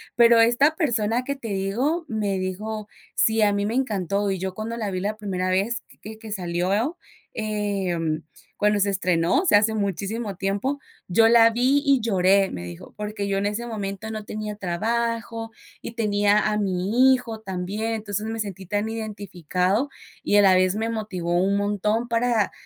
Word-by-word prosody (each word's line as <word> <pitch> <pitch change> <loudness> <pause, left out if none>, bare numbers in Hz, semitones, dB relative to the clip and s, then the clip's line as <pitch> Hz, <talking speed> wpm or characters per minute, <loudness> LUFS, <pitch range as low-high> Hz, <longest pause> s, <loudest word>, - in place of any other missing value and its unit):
Pero 235 -1 +6
esta 240 +7 +4
persona 240 -6 0
que 280 +2 -3
te 265 -4 -8
digo 235 - -1
me 210 -4 -1
dijo: 210 +3 -4 0.3
"sí, 220 0 +3
a 210 -1 +4
mí 200 0 0
me 215 - -2
encantó, 205 -5 0
y 190 - -1
yo 190 0 -3
cuando 225 +2 -4
la 215 -3 -2
vi 185 - -2
la 210 +2 -2
primera 185 -3 -2
vez 200 +5 0 0.2
que 220 +1 -9
que 220 -1 -9
salió, 195 - -1 0.4
em, 195 -7 -2 0.3
cuando 210 0 +2
se 200 0 +2
estrenó, 180 - +2
o - - -4
sea, 205 - +6
hace 220 +1 +1
muchísimo 205 +1 -2
tiempo, 200 +10 -1 0.3
yo 225 +5 +5
la 230 -1 +7
vi, 255 +5 +2
y 275 -2 +4
lloré", 195 -2 +3
me 85 - -6
dijo, 85 -1 -10
"porque 210 -1 -4
yo 195 -1 0
en 200 - -1
ese 210 +3 -3
momento 205 -1 -5
no 215 -1 -5
tenía 210 -1 -5
trabajo 225 +4 -2 0.3
y - - -6
tenía 205 -2 +2
a 210 - 0
mi 205 +7 +3
hijo 235 -3 -3
también, 200 +3 -3
entonces 210 -1 -3
me 225 0 -4
sentí 195 -3 -5
tan 205 +3 -1
identificado 205 - -2 0.3
y - - +1
a - - +7
la 190 -1 +6
vez 185 +1 +3
me 225 +1 -1
motivó 200 -6 -3
un 200 +2 +2
montón 210 +3 0
para 230 -3 +1
210 Hz, 180 wpm, -24 LUFS, 195-230 Hz, 0.4 s, la